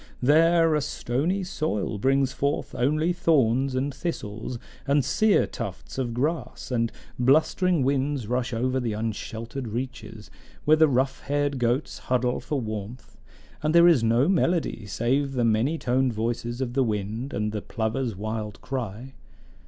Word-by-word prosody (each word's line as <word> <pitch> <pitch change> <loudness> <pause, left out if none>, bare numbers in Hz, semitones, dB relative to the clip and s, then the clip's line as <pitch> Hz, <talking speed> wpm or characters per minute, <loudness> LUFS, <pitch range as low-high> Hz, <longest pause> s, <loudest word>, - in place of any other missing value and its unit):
There 165 +4 +4
a 150 - +2
stony 145 +7 -1
soil 115 - -2
brings 135 +2 +2
forth 140 +1 -1
only 155 +7 +1
thorns, 135 -6 +2
and 135 +2 -1
thistles, 115 -8 -4 0.3
and 140 -1 +3
sere 215 +8 +3
tufts - - -6
of 125 -3 -1
grass; 150 +2 -2
and 115 -2 +1 0.3
blustering 155 +5 +3
winds 135 -1 0
rush 125 +1 -1
over 130 +3 0
the 120 -4 -2
unsheltered 115 +3 -4
reaches, 110 -3 -6 0.3
where 155 +1 +6
the 160 0 +6
rough 130 0 0
haired 145 -1 0
goats 120 +4 0
huddle 125 -1 0
for 145 - -2
warmth; 110 -1 -7 0.4
and 155 +2 +1
there 170 0 +8
is 155 -9 +5
no 115 +5 +3
melody 170 - +1
save 135 +6 0
the 125 -3 +1
many 115 +8 +2
toned 130 -2 +1
voices 120 +2 -2
of 125 -2 -2
the 135 0 +3
wind 110 +4 -3
and 105 +1 -1
the 105 -1 -3
plover's 115 +1 -2
wild 105 +1 -4
cry. 125 0 -5
130 Hz, 150 wpm, -26 LUFS, 115-145 Hz, 0.4 s, there